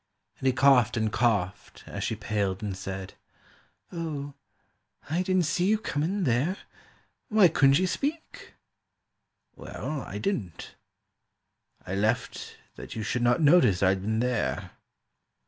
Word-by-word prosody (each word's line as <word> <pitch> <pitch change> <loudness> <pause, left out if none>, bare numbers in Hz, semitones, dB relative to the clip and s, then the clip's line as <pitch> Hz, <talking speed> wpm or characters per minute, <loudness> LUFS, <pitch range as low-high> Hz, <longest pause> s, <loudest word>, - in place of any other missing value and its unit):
And 135 - -1
he - - +5
coughed 130 -3 +4
and 110 -1 0
coughed 100 -4 -1
as - - -6
she - - -1
paled 105 -2 -2
and 100 -2 -3
said, 95 0 -6 0.8
"O, 150 -5 -5 0.8
I 170 +3 +1
didn't 185 -1 +1
see 175 +4 0
you 215 +1 +3
come 165 -8 -3
in 190 +5 -1
there— 145 - +1 0.7
Why 210 -4 +6
couldn't 140 -4 +4
you 185 - +2
speak?"—"Well, 275 - -7
I 100 - -7
didn't. 105 - -4 1.1
I 90 - -5
left 110 +4 -2 0.2
That - - -9
you 110 - -3
should 120 +3 -2
not 120 +6 +3
notice 130 - +5
I'd 95 0 +3
been 110 +3 -1
there. 125 -3 -1
125 Hz, 130 wpm, -27 LUFS, 105-165 Hz, 1.1 s, Why